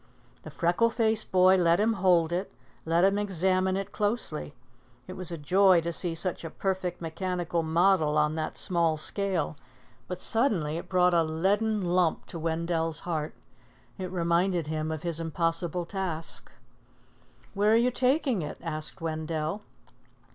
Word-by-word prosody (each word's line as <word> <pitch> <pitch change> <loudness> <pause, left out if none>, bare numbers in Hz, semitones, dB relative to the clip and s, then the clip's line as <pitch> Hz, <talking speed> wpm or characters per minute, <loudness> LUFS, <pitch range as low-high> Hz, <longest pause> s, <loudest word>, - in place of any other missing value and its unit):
The - - -9
freckle 175 +7 +1
faced 220 -2 0
boy 185 0 +5
let 170 -1 +3
him 220 +2 +2
hold 180 -5 +3
it, 180 +3 -2 0.3
let 165 +2 +2
him 195 +1 +3
examine 190 -1 +1
it 195 0 -4
closely. 205 - -3 0.5
It 185 - -8
was 185 -2 -6
a 170 - -4
joy 185 +4 +4
to 170 +1 -3
see 170 0 +1
such 175 +1 0
a 165 - -5
perfect 185 0 -3
mechanical 175 0 -2
model 160 -1 +2
on 150 0 +2
that 155 -1 -4
small 170 -4 +1
scale; 190 -1 -2 0.5
but 180 -1 -5
suddenly 180 - 0
it 170 - -8
brought 180 -1 +3
a 170 - +4
leaden 200 +7 0
lump 175 -2 +1
to 165 - -7
Wendell's 165 0 -1
heart. 160 -3 -3 0.6
It 185 -1 -4
reminded 175 0 +1
him 155 +1 -3
of 155 -1 -5
his 170 -2 -1
impossible 165 +1 -1
task. 170 -3 -5 1.0
"Where 210 +2 +3
you 240 +2 +3
taking 255 - +1
it?" 150 - -6
asked 155 -2 -4
Wendell. 160 +3 -3
175 Hz, 150 wpm, -28 LUFS, 165-190 Hz, 1.0 s, boy